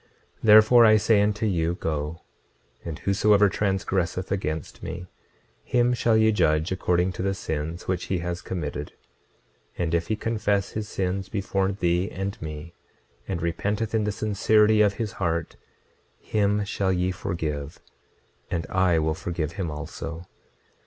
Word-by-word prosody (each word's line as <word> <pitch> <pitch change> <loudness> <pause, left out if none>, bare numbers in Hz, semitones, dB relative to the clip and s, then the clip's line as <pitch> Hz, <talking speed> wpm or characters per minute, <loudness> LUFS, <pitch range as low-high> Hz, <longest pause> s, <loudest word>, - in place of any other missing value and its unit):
26:29 - - -36
Therefore 110 +2 +8
I 110 0 +6
say 105 0 +3
unto 105 +1 0
you, 85 -4 0
Go; 75 -1 -3 0.6
and 80 -3 -5
whosoever 100 +1 +3
transgresseth 95 -2 -1
against 80 -5 -3
me, 90 - -6 0.6
him 125 0 +2
shall 115 -2 +2
ye 110 0 +4
judge 80 -5 +2
according 90 0 +1
to 90 - -6
the 95 0 0
sins 80 0 -4
which 90 -1 -1
he 95 - -1
has 85 0 -4
committed; 75 -5 -5 0.8
and 85 -2 -1
if 85 0 +1
he 110 - 0
confess 105 -3 -1
his 105 -1 -4
sins 95 0 -2
before 100 -1 -1
thee 90 -1 0
and 95 +1 -5
me, 75 +1 -7 0.5
and 85 -3 -3
repenteth 105 +6 -1
in 110 -2 +1
the 105 - 0
sincerity 105 +1 +3
of 100 -1 +3
his 110 -3 -3
heart, 85 -2 -1 0.6
him 105 -1 0
shall 100 -1 0
ye 90 0 +1
forgive, 80 -6 -4 0.7
and 85 -1 -2
I 95 -2 +3
will 80 0 +1
forgive 85 -2 -3
him 95 -4 -4
also. 80 +2 -6
95 Hz, 150 wpm, -25 LUFS, 85-105 Hz, 0.8 s, Therefore